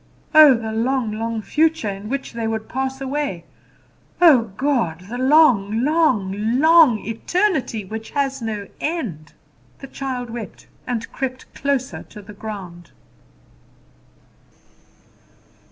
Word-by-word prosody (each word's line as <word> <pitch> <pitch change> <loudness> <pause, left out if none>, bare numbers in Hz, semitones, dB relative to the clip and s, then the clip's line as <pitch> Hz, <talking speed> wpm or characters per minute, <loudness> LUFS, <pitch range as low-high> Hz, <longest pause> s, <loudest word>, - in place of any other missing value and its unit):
Oh, 305 -4 +9
the 225 -1 -4
long, 235 +1 0
long 225 0 -3
future, 320 -4 +1
in 200 +1 -5
which 275 -1 -4
they 230 -1 -3
would 220 -1 -3
pass 265 +1 -3
away! 270 - -3 0.7
Oh, 260 - +5
God! 240 - 0
the 245 - -4
long, 255 -7 +4
long, 275 -11 +2 0.3
long 315 -6 +6
eternity, 255 - -1
which 220 +3 -7
has 275 -2 -2
no 210 -3 -4
end! 195 - -4 0.4
The - - -10
child 255 -3 -5
wept, 230 -4 -8 0.2
and 235 -3 -3
crept 255 -1 -5
closer 275 -2 -2
to 210 - -11
the 210 +1 -12
ground. 195 -5 -8
245 Hz, 120 wpm, -21 LUFS, 215-275 Hz, 0.7 s, Oh